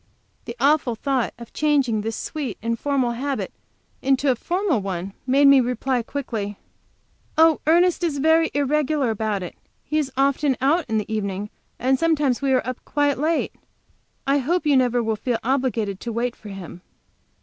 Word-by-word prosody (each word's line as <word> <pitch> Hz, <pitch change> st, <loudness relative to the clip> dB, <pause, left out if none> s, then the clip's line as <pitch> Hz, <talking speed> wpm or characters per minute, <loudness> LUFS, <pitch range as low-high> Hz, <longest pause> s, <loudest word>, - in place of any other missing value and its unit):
The 235 Hz, -, -6 dB
awful 275 Hz, -3 st, +3 dB
thought 260 Hz, 0 st, -1 dB
of 235 Hz, -1 st, -12 dB
changing 275 Hz, -8 st, +1 dB
this 225 Hz, +1 st, -3 dB
sweet, 280 Hz, -10 st, -4 dB
informal 245 Hz, +2 st, 0 dB
habit 270 Hz, +3 st, -3 dB, 0.5 s
into 270 Hz, 0 st, +2 dB
a -, -, +1 dB
formal 350 Hz, -, 0 dB
one 190 Hz, 0 st, -4 dB
made 280 Hz, +2 st, +5 dB
me 275 Hz, -1 st, +8 dB
reply 250 Hz, +1 st, 0 dB
quickly: 225 Hz, -6 st, -4 dB, 0.8 s
"Oh, 320 Hz, -1 st, +5 dB
Ernest 350 Hz, +2 st, +4 dB
is 315 Hz, -4 st, 0 dB
very 320 Hz, +3 st, +3 dB
irregular 290 Hz, -2 st, +1 dB
about 215 Hz, -3 st, -2 dB
it. 175 Hz, -, -7 dB, 0.3 s
He 305 Hz, +2 st, 0 dB
is 280 Hz, -3 st, -2 dB
often 275 Hz, 0 st, +2 dB
out 300 Hz, +6 st, +2 dB
in 220 Hz, -, +1 dB
the 215 Hz, +1 st, -3 dB
evening, 200 Hz, -1 st, -3 dB, 0.3 s
and 260 Hz, +1 st, +1 dB
sometimes 300 Hz, -6 st, +1 dB
we 275 Hz, -1 st, +1 dB
are 255 Hz, -1 st, +1 dB
quite 290 Hz, -2 st, 0 dB
late. 320 Hz, +2 st, 0 dB, 0.7 s
I 280 Hz, +1 st, +3 dB
hope 325 Hz, +5 st, 0 dB
you 290 Hz, -2 st, +4 dB
never 245 Hz, -2 st, +2 dB
will 220 Hz, -1 st, 0 dB
feel 235 Hz, +2 st, -1 dB
obliged 235 Hz, -6 st, 0 dB
to 235 Hz, -, -5 dB
wait 235 Hz, +1 st, -2 dB
for 215 Hz, -, -12 dB
him." 180 Hz, -3 st, -9 dB
260 Hz, 165 wpm, -23 LUFS, 225-290 Hz, 0.8 s, me